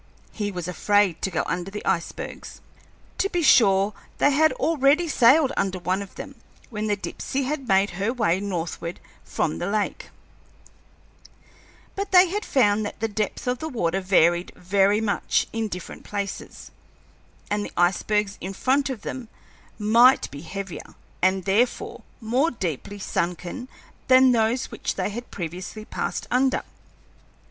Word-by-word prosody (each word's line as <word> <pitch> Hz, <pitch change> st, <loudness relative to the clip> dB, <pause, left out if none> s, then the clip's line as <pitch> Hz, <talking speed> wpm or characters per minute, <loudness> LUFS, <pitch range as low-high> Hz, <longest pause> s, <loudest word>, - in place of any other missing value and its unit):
He 205 Hz, -2 st, -3 dB
was 180 Hz, -3 st, -5 dB
afraid 195 Hz, -1 st, +2 dB
to -, -, 0 dB
go 165 Hz, -4 st, -1 dB
under 180 Hz, +1 st, -3 dB
the 210 Hz, +1 st, -7 dB
icebergs. 170 Hz, -, -3 dB, 0.6 s
To 395 Hz, -, +1 dB
be 350 Hz, -3 st, -1 dB
sure, 200 Hz, -6 st, +5 dB, 0.2 s
they 285 Hz, -, +4 dB
had 315 Hz, +3 st, +4 dB
already 310 Hz, +1 st, +2 dB
sailed 275 Hz, +1 st, +5 dB
under 190 Hz, -1 st, 0 dB
one 185 Hz, +2 st, -1 dB
of 200 Hz, -, -10 dB
them -, -, -9 dB, 0.3 s
when 215 Hz, -1 st, -3 dB
the 205 Hz, -, +2 dB
Dipsey 265 Hz, +6 st, -4 dB
had 275 Hz, -1 st, -3 dB
made 195 Hz, -1 st, +3 dB
her 195 Hz, +5 st, -1 dB
way 190 Hz, -8 st, +1 dB
northward 175 Hz, -3 st, -4 dB, 0.2 s
from 80 Hz, -, -2 dB
the -, -, -2 dB
lake, 210 Hz, 0 st, -2 dB, 1.9 s
but 400 Hz, 0 st, -3 dB
they 365 Hz, -1 st, +7 dB
had 415 Hz, +4 st, -2 dB
found 215 Hz, -, +2 dB
that 205 Hz, -, -6 dB
the 225 Hz, -, 0 dB
depth 210 Hz, -1 st, -3 dB
of 250 Hz, 0 st, -1 dB
water 195 Hz, -, -1 dB
varied 175 Hz, -2 st, +3 dB
very 200 Hz, +3 st, +2 dB
much 210 Hz, -2 st, +1 dB
in 225 Hz, -1 st, -1 dB
different 180 Hz, -3 st, -8 dB
places, 200 Hz, -1 st, -6 dB, 0.8 s
and 205 Hz, 0 st, 0 dB
the -, -, -7 dB
icebergs 195 Hz, +3 st, +1 dB
in 190 Hz, +2 st, -5 dB
front 270 Hz, +7 st, +1 dB
of 240 Hz, -6 st, -5 dB
them 255 Hz, -3 st, -5 dB, 0.5 s
might 230 Hz, +4 st, +5 dB
be 140 Hz, -, -8 dB
heavier, 195 Hz, +1 st, -7 dB, 0.3 s
and 185 Hz, 0 st, +2 dB
therefore 210 Hz, +6 st, 0 dB, 0.2 s
more 250 Hz, +7 st, +1 dB
deeply 190 Hz, -, -4 dB
sunken, 180 Hz, +6 st, -3 dB, 0.4 s
than 260 Hz, 0 st, +7 dB
those 230 Hz, +1 st, +1 dB
which -, -, -3 dB
they -, -, -2 dB
had 240 Hz, +4 st, -7 dB
previously 180 Hz, +5 st, -6 dB
passed -, -, -3 dB
under. 260 Hz, +2 st, +2 dB
210 Hz, 150 wpm, -24 LUFS, 190-255 Hz, 1.9 s, they